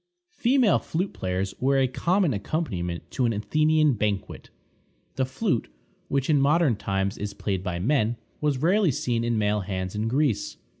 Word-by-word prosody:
Female 245 - +3
flute 180 +4 -3
players 95 +1 -2
were 135 +1 +2
a 135 -1 +3
common 175 +4 +1
accompaniment 100 - -3
to 130 -5 +1
an 115 - 0
Athenian 155 +7 +2
banquet. 105 -3 -3 0.7
The 130 - +1
flute, 130 - -1 0.4
which 135 -1 0
in 150 -3 +3
modern 150 -2 +3
times 100 0 -2
is 100 -1 -4
played 95 -3 -2
by 90 -2 -3
men, 115 +3 +1 0.2
was 150 -3 +1
rarely 185 +6 +3
seen 120 -3 -1
in 120 -1 0
male 105 0 +1
hands 95 -1 -4
in 105 +1 -2
Greece. 120 -5 0
120 Hz, 160 wpm, -25 LUFS, 100-155 Hz, 0.7 s, Female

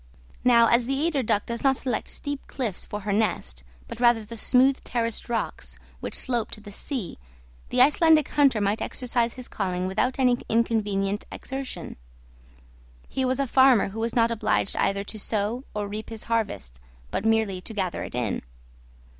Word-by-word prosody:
Now, 235 -2 +6
as 235 +1 +3
the 270 +1 0
eider 310 -5 +1
duck 210 -3 0
does 235 0 -4
not 270 -1 +4
select 255 - -2
steep 285 -1 -5
cliffs 235 -9 -3
for 210 - -5
her 200 0 -1
nest, 170 - -1 0.2
but - - -8
rather 240 -3 +4
the 230 +2 -8
smooth 260 +4 +3
terraced 230 -1 -2
rocks 235 -1 -3 0.2
which - - -5
slope 240 -4 0
to - - -5
the 205 -1 -11
sea, 220 - -5 0.5
the 250 - +3
Icelandic 310 +2 +5
hunter 275 -6 +4
might 205 +1 0
exercise 240 -2 -1
his 255 -2 -7
calling 185 -2 -2
without 215 +7 0
any 250 -2 +3
inconvenient 210 -3 0
exertion. 270 0 -6 1.1
He 265 - -1
was 255 0 +1
a 275 - +2
farmer 260 -5 +5
who 215 +3 -7
was 230 +1 -2
not 230 -1 +3
obliged 220 -3 0
either 200 0 +1
to 215 +1 -8
sow 220 +5 -2
or 205 -1 -2
reap 210 +1 -6
his 225 -1 -4
harvest, 205 - -2 0.3
but - - -2
merely 220 -4 +1
to 205 - -7
gather 190 -5 -2
it - - -7
in. 120 -5 -1
230 Hz, 175 wpm, -26 LUFS, 205-255 Hz, 1.1 s, Now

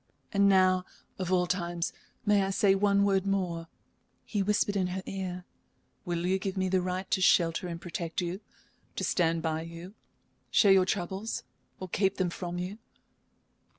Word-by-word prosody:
"And 200 0 +5
now 185 -1 +4 0.4
of 185 -1 -2
all 180 -1 +3
times 175 -1 -2 0.3
may 205 -1 +4
I 195 - 0
say 195 0 +3
one 200 0 +3
word 195 -1 +2
more?" 175 -4 -1 0.6
he 205 - -1
whispered 205 +1 +1
in 190 -2 +1
her 185 +1 -4
ear. 180 -2 -5 0.6
"Will 175 0 -2
you 190 +1 +1
give 190 0 -4
me 185 0 +1
the 185 0 +2
right 185 +1 -3
to 190 - +2
shelter 170 -1 +3
and 170 -1 -5
protect 170 -1 -4
you, 180 +2 -3 0.5
to - - -3
stand 165 -2 +1
by 160 -1 -1
you, 170 +3 -9 0.6
share 200 - +5
your 190 -1 +5
troubles, 195 +3 -2 0.4
or 185 - -5
keep 190 +2 +1
them 180 -2 0
from 175 0 -5
you 185 +4 -4
185 Hz, 170 wpm, -29 LUFS, 175-195 Hz, 0.6 s, And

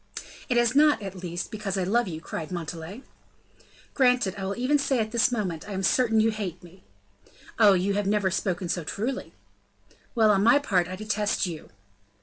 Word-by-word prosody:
"It 245 - +2
is 240 0 +3
not, 300 +1 +5
at 195 -1 -5
least, 175 +2 -5
because 210 -3 -4
I 190 - 0
love 225 +5 +1
you," 160 -3 -6
cried 165 0 -6
Montalais. 170 - -6 0.9
"Granted. 250 -7 +2
I 195 - -5
will 195 +1 -3
even 270 +4 +2
say, 275 -1 0
at 220 -1 -1
this 235 +1 +2
moment, 200 -6 -3
I - - -5
am 190 0 -3
certain 225 +1 +2
that 215 - +5
you 225 - +2
hate 190 -6 -5
me." 180 +2 -16 0.8
"Oh, 210 -3 +7
you 190 +2 +1
have 205 0 -1
never 200 -2 +1
spoken 180 -1 -2
so 175 0 -2
truly." 230 - -4 0.8
"Well, 220 -2 +5
on 195 -1 +2
my 260 +6 +6
part, 190 - +1
I 185 - -6
detest 210 +1 -1
you." 165 -4 -7
200 Hz, 195 wpm, -26 LUFS, 185-235 Hz, 0.9 s, Oh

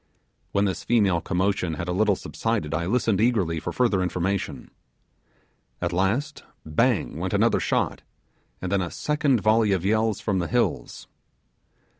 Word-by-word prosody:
When 100 +1 +2
this 95 - -2
female 100 -7 +2
commotion 90 -3 0
had 85 +4 -5
a - - -1
little 100 +2 +2
subsided 105 -7 -3
I 85 +2 -1
listened 110 -2 +1
eagerly 100 -9 +1
for 85 - -4
further 110 -3 +1
information. 90 +2 -2 1.1
At - - -2
last 115 - -1 0.2
bang 75 -1 0
went - - -2
another - - +3
shot, - - -1 0.6
and 90 - -3
then 100 -1 +2
a 90 - -3
second 150 - 0
volley 110 -1 +3
of 95 -1 -1
yells 110 0 +1
from 105 -3 -1
the 85 - -1
hills. - - -1
100 Hz, 150 wpm, -25 LUFS, 90-110 Hz, 1.1 s, another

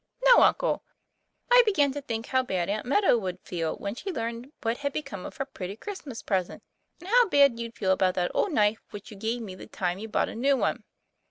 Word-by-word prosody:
"No, - - +8
uncle; - - +3 0.7
I - - +9
began 300 -11 +2
to 290 +1 -5
think 230 -4 -4
how 260 -1 +2
bad 185 -8 -2
Aunt 215 +3 -2
Meadow 285 - +3
would 185 -3 -4
feel 165 -3 -3
when 200 0 -5
she 385 - -5
learned 235 -1 -5
what 230 +1 0
had 280 -1 -2
be 305 - -2
come 200 -10 -7
of - - -12
her 270 - -2
pretty 195 -8 -7
Christmas 285 - -8
present, 185 -4 -2 0.4
and 350 - -12
how 475 +1 +4
bad 280 -6 +4
you'd 235 0 -6
feel 190 -3 +1
about 185 -1 +2
that 180 -1 0
old 405 - +1
knife 215 -5 +2
which 205 +1 -10
you 210 - -10
gave 225 +3 -2
me 195 -4 -7
the 185 - -11
time 180 0 -2
you 220 - -6
bought 215 - 0
a - - -7
new 270 +4 +2
one." - - -1
230 Hz, 235 wpm, -27 LUFS, 195-280 Hz, 0.7 s, I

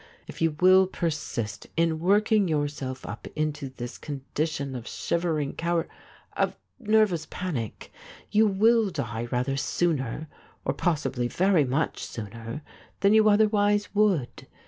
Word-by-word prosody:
If - - -10
you 165 -2 +2
will 185 +1 +6
persist 150 - -3
in 165 -1 +2
working 205 +3 +3
yourself 145 -4 -2
up 105 +2 -7
into 150 -2 -2
this 120 -1 -8
condition 145 0 -3
of 120 -2 -6
shivering 160 -4 -1
cowar 170 0 -1 0.3
— - - -28
of - - 0 0.2
nervous 215 -8 +2
panic, 135 - -5 0.4
you 215 +1 +5
will 220 +2 +4
die 115 - -3
rather 125 +2 0
sooner, 150 -2 -1 0.4
or - - +1
possibly 145 -8 0
very 180 +1 +3
much 135 +5 -1
sooner, 115 +6 -7 0.4
than 200 +1 +5
you 215 0 +6
otherwise 205 -1 +3
would. 200 -11 +1
160 Hz, 130 wpm, -26 LUFS, 135-195 Hz, 0.4 s, will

